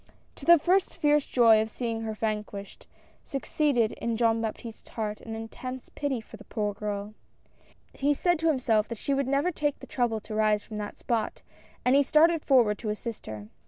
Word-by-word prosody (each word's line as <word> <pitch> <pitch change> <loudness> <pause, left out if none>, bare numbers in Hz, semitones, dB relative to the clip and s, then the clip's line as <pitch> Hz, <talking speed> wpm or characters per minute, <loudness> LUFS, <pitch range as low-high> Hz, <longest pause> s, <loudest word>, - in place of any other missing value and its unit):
To - - -10
the 340 0 +8
first 360 +5 +1
fierce 295 -1 +3
joy 225 -3 +5
of 220 - -3
seeing 230 0 -3
her 220 -1 -3
vanquished, 210 -2 -4 0.4
suc 275 - -5
ceeded 260 -8 +2
in 230 -1 -3
Jean 225 -1 +2
Baptiste's 225 0 -6
h^art 210 -2 -4
an 225 -1 -6
intense 255 +3 -7
pity 285 -4 -2
for 220 0 -12
the 210 - -13
poor 210 -1 -2
girl. 205 0 -4 0.8
He 285 +1 +1
said 350 +2 +1
to 325 - +1
himself 245 -8 +2
that 230 - -6
she 280 - -1
would 275 -1 0
never 280 +6 +1
take 295 -3 -1
the - - -11
trouble 240 -3 0
to 215 - -8
rise 215 -1 +2
from 215 -1 -7
that 205 0 -6
spot, 225 -3 -2 0.4
and 250 +2 +5
he 280 - +6
started 315 +3 +4
forward 235 -7 +4
to 220 - -4
assist 215 +2 -5
her. 105 -1 -7
230 Hz, 195 wpm, -28 LUFS, 215-275 Hz, 0.8 s, the